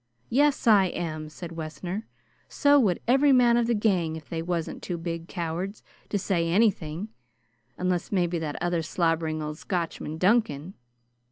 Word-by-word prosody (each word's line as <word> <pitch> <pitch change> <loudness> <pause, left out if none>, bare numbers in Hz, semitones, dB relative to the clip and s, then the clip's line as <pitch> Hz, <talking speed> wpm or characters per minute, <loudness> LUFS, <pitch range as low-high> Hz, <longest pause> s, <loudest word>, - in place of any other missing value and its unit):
"Yes, 285 +3 +3
I 210 -4 +6
am," 155 -4 -4
said 170 +2 -8
Wessner. 170 +6 -5 0.4
"So 285 -1 +4
would 195 -9 +2
every 270 +4 +5
man 245 -2 +5
of 235 -1 +2
the 235 - +2
gang 185 -7 +1
if 160 -2 -9
they 165 -1 -3
wasn't 170 -1 -3
too 175 - -4
big 165 0 -5
cowards 175 +4 -4 0.3
to 205 - 0
say 175 -4 0
anything, 185 -2 +1 0.7
unless 180 -1 -1
maybe 175 -3 +1
that 150 -2 -4
other 175 -1 0
slobbering 160 -1 0
old 150 0 -5
Scotchman, 165 -3 -3
Duncan. 190 -4 +1
175 Hz, 155 wpm, -26 LUFS, 165-210 Hz, 0.7 s, I